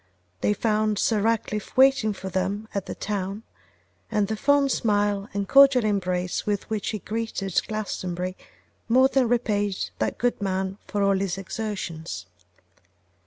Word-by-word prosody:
They 210 - +2
found 215 -1 +1
Sir 215 0 +2
Ratcliffe 215 -1 -1
waiting 265 -5 +5
for 190 -1 -7
them 195 +4 -2
at 200 -1 -3
the - - -5
town, 200 +1 -3 0.7
and 210 -2 +1
the 220 - 0
fond 280 +4 +3
smile 205 -3 +1
and 200 -1 -2
cordial 275 -2 +6
embrace 180 -3 -1
with 205 -2 -2
which 215 -2 -1
he 215 - -2
greeted 210 -2 -2
Glastonbury 185 -4 -3 0.5
more 260 +3 +5
than 260 -4 +2
repaid 205 -5 0
that - - -1
good 245 -2 0
man 190 0 -2
for 205 -1 -1
all 195 -1 +3
his 190 -2 -2
exertions. 190 - -5
205 Hz, 145 wpm, -25 LUFS, 195-225 Hz, 0.7 s, cordial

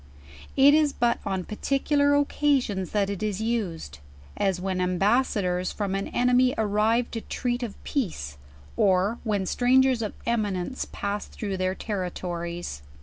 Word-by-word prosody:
It 275 +2 +7
is 300 -2 +3
but 240 0 +1
on 190 -2 -1
particular 285 - +1
oc 285 0 +2
casions 245 - +1
that 205 -2 +1
it 200 -1 -4
is 210 -2 -1
used: 190 - -3 0.4
as 190 -3 0
when 185 0 -2
ambassadors 185 -1 +1
from 200 -2 -3
an 195 0 -2
enemy 250 +1 +3
arrive 220 +3 +1
to 225 - -4
treat 245 +1 -2
of 235 -5 -4
pence, 75 - -3 0.4
or 195 +3 +2
v\hen 210 -4 0
Grangers 255 +3 +3
of 215 - -3
eminence 215 -1 -1
pass 200 0 -3
through 200 -3 -4
their 185 0 0
territories. 175 - -4
210 Hz, 145 wpm, -26 LUFS, 185-245 Hz, 0.4 s, It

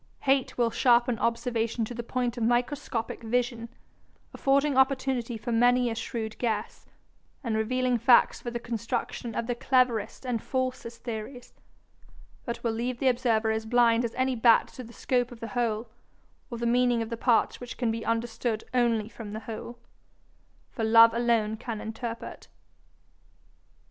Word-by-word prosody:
Hate 270 -1 +1
will 235 -2 +2
sharpen 240 -2 +3
observation 230 -1 -1
to 245 - -7
the 235 - -4
point 245 0 -2
of 240 - -6
microscopic 240 0 -1
vision, 235 0 -1 0.6
affording 280 +1 +2
opportunity 260 -3 +1
for 220 +3 -5
many 245 +1 +3
a - - -1
shrewd 225 -1 -5
guess, 220 -4 -3 0.6
and 230 -4 -1
revealing 250 +2 0
facts 240 +1 +4
for 240 - -4
the 240 0 -4
construction 230 0 -4
of 235 - -1
the 245 - -1
cleverest 250 -2 +1
and 240 -3 -1
falsest 255 -3 -3
theories, 240 +2 -7 0.9
but 235 -1 -5
will 230 - +1
leave 235 +2 -3
the 265 +1 +2
observer 235 -3 +1
as 220 0 -2
blind 235 0 +4
as 235 - -3
any 260 0 0
bat 230 0 +4
to 255 - -9
the 235 - -12
scope 245 0 -1
of 240 - -11
the 230 - -6
whole, 235 -2 -1 0.6
or 235 - -5
the 235 - -3
meaning 240 -1 +2
of 225 - -9
the - - -1
parts 230 -1 +2
which 245 0 -8
can 240 -3 0
be 225 0 -4
understood 230 -1 -2
only 235 -4 +2
from 220 -2 -9
the 220 - -5
whole; 225 +2 -7 0.9
for 225 - -4
love 230 +1 +7
alone 230 -2 +1
can 220 -1 -6
interpret. 225 +1 -6
235 Hz, 160 wpm, -27 LUFS, 225-245 Hz, 0.9 s, love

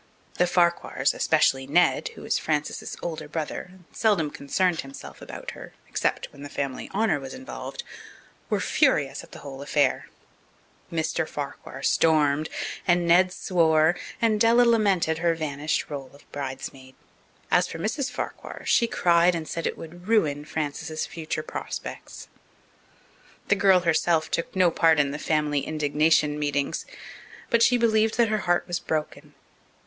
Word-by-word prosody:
The 180 - +4
Farquhars, 175 -1 +2
especially 135 0 +2
Ned, 175 - +3
who - - -11
was - - 0
Frances's - - -2
older 160 -3 -4
brother 155 +3 -4
and 185 0 -18
seldom 195 -10 +1
concerned 170 +5 0
himself 135 0 -11
about - - -7
her - - -11
except - - -1
when 140 - -13
the 145 - -7
family 135 -3 -4
honour 195 -6 +1
was 135 -1 -8
involved, 285 - -7 0.7
were - - +1
furious 150 - +1
at - - -16
the - - -10
whole 135 -1 -7
affair. 145 -1 +1 0.8
Mr. - - -1
Farquhar - - -7
stormed, 155 -1 +3 0.4
and 175 -1 +3
Ned 180 +2 +5
swore, 165 -3 +3 0.2
and 220 -2 +2
Della 235 +2 +6
lamented 200 -9 +2
her 170 0 +2
vanished 150 -1 -2
role 135 -2 -5
of 145 - -19
bridemaid. 130 -1 -7 0.6
As - - +4
for - - -7
Mrs. 250 - -2
Farquhar, 250 - -6
she 235 - +3
cried 175 -4 +3
and 160 -2 -4
said 165 - -2
it - - -4
would 175 +3 -11
ruin 150 -10 +2
Frances's 155 +1 -3
future 155 -1 -4
prospects. - - -7 1.2
The 200 - +5
girl 195 -2 +5
herself 165 -1 +1
took 170 - -2
no 180 -2 +4
part 160 -1 +4
in 140 -1 +2
the 145 - -5
family 150 -2 +1
indignation 150 0 +1
meetings. 145 - -1 0.6
But 235 - +4
she 245 +1 +5
believed 220 -1 +2
that 235 -2 +4
her 215 0 +1
heart 175 -2 +1
was 175 -1 -2
broken. 155 -3 -4
165 Hz, 150 wpm, -25 LUFS, 150-185 Hz, 1.2 s, Della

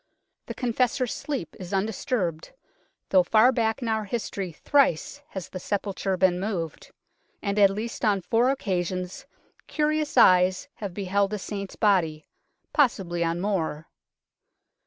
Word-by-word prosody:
The - - -6
Confessor's 250 0 0
sleep 275 - -5
is 185 +1 -7
un 195 +1 +2
disturbed, 185 -6 -3 0.6
though 185 - +6
far 220 +7 +5
back 230 0 0
in - - -2
our 220 -1 0
history 200 -4 -4
thrice 280 - +1
has 190 - -7
the 185 - -6
sepulture 195 -1 -2
been 180 -1 +3
moved, 180 -6 -4 0.5
and 200 0 -1
at 200 -1 +7
least 220 +5 -5
on 205 -3 +2
four 230 +7 +2
occasions 185 -7 -2 0.4
curious 305 -1 0
eyes 185 +4 +5
have 200 -4 -6
beheld 200 0 +1
the 210 - -3
Saint's 200 0 -6
body 165 -7 +1 0.5
possibly 190 - +1
on 165 +1 -1
more. 165 -6 -2
200 Hz, 135 wpm, -26 LUFS, 180-230 Hz, 0.6 s, at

